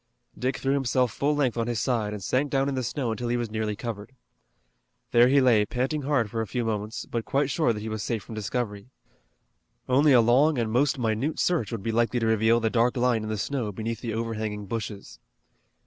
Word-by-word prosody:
Dick 130 +1 -2
threw 135 0 0
himself 130 -3 +1
full 145 +2 0
length 130 -5 0
on 115 - -1
his 120 -3 -1
side, 115 -5 0
and 105 -2 -6
sank 135 +8 0
down 135 0 +1
in 140 - -1
the 130 - -1
snow 125 0 -2
until 120 +2 -3
he 120 +1 0
was 120 -3 -3
nearly 110 -1 -2
covered. 110 +1 -6 1.0
There 120 0 +6
he 140 +2 +4
lay 120 -5 +4
panting 130 +7 -2
hard 135 -5 +1
for 115 - -2
a 110 - -3
few 120 +3 -2
moments, 110 +1 -3
but 115 -1 -3
quite 140 +2 0
sure 155 -7 +2
that 105 -2 -4
he 110 - -5
was 110 -1 -3
safe 110 -2 -2
from - - -10
discovery. 110 0 -4 1.0
Only 140 +4 +4
a 125 - +7
long 130 +6 +4
and 115 -2 -1
most 140 +5 +2
minute 120 +5 -1
search 170 - 0
would 115 -4 -4
be 115 - -1
likely 120 +2 +1
to 115 - -1
reveal 110 +1 +3
the 110 -1 0
dark 120 +1 +2
line 120 -2 +2
in 110 - -5
the 110 - -2
snow 115 0 -2
beneath 110 +3 -4
the 115 -2 -3
overhanging 110 -2 -3
bushes. 105 -1 -6
115 Hz, 225 wpm, -26 LUFS, 110-130 Hz, 1.0 s, a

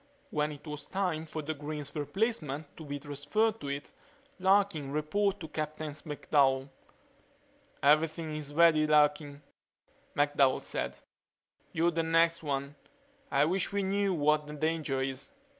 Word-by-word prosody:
When 150 0 0
it 145 +1 -11
was 150 -1 -7
time 180 -5 -1
for 155 0 -5
Green's 150 -1 -5
replacement 155 - -2
to 160 - -9
be 145 -1 -4
transferred 175 +11 -1
to - - -5
it 140 +1 -4 0.5
Larkin 190 -7 +2
reported 195 +7 0
to 160 - -5
Captain 155 0 -4
McDowell. 140 -3 +1 1.1
"Everything 155 +2 +3
is 150 -1 -6
ready, 155 -1 +5
Larkin," 150 -1 +2 0.7
McDowell 145 -2 +3
said. - - -3 0.7
"You're 170 +1 +2
the 165 0 0
next 165 +1 +3
one. 140 -2 -2 0.6
I 145 - +3
wish 180 +3 0
we 200 0 0
knew 195 0 +1
what 150 0 +2
the 150 - -7
danger 150 -3 -1
is." 135 - -4
155 Hz, 135 wpm, -31 LUFS, 145-165 Hz, 1.1 s, ready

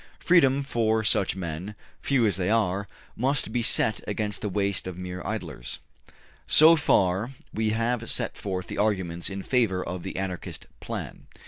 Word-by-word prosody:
Freedom 140 -6 +4
for 110 -4 +1
such 100 -2 +2
men, 90 +3 -5 0.3
few 130 -4 +2
as 105 - +1
they 95 0 -1
are, 100 -3 +1 0.3
must 135 +4 0
be 120 - +1
set 110 -1 +2
against 105 0 -2
the 105 - -2
waste 100 -1 -1
of 95 - -5
the 90 - -8
mere 90 0 -5
idlers. - - -5 0.7
So 160 +2 +8
far, 100 - +2 0.2
we 110 0 0
have 115 +1 -1
set - - -1
forth 95 -3 -4
the - - -6
arguments 95 -5 0
in 100 -1 -5
favor 110 -8 +1
of 90 0 -5
the - - -6
Anarchist 95 -2 -5
plan. - - -6
105 Hz, 165 wpm, -26 LUFS, 95-115 Hz, 0.7 s, So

